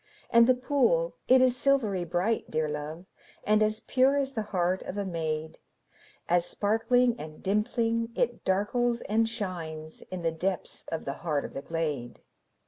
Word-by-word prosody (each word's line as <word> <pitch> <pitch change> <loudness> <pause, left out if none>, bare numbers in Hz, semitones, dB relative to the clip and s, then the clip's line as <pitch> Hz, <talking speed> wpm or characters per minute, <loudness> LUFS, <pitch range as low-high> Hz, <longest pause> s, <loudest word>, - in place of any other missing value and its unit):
And 235 0 +7
the 255 - +5
pool, 290 - +1
it 255 0 +6
is 255 -1 +4
silvery 240 -9 +1
bright, 180 +7 -1
dear 155 0 0
love, 150 +3 -5 0.4
And 215 +1 +3
as 215 0 +2
pure 265 +2 +3
as 275 -1 -1
the 225 - -1
heart 180 0 0
of 200 - -6
a 200 - -1
maid, 160 -3 -3 0.7
As 175 0 +3
sparkling 225 +6 +2
and 155 0 -9
dimpling, 230 +3 0
it 240 -1 -1
darkles 235 +5 +1
and 225 +2 +1
shines 165 -7 -5
In 185 -2 -5
the 165 - +1
depths 180 +3 -3
of 165 - -3
the 140 - -2
heart 150 -4 -1
of - - -8
the 135 - -5
glade. 150 -7 -3
200 Hz, 165 wpm, -28 LUFS, 165-240 Hz, 0.7 s, And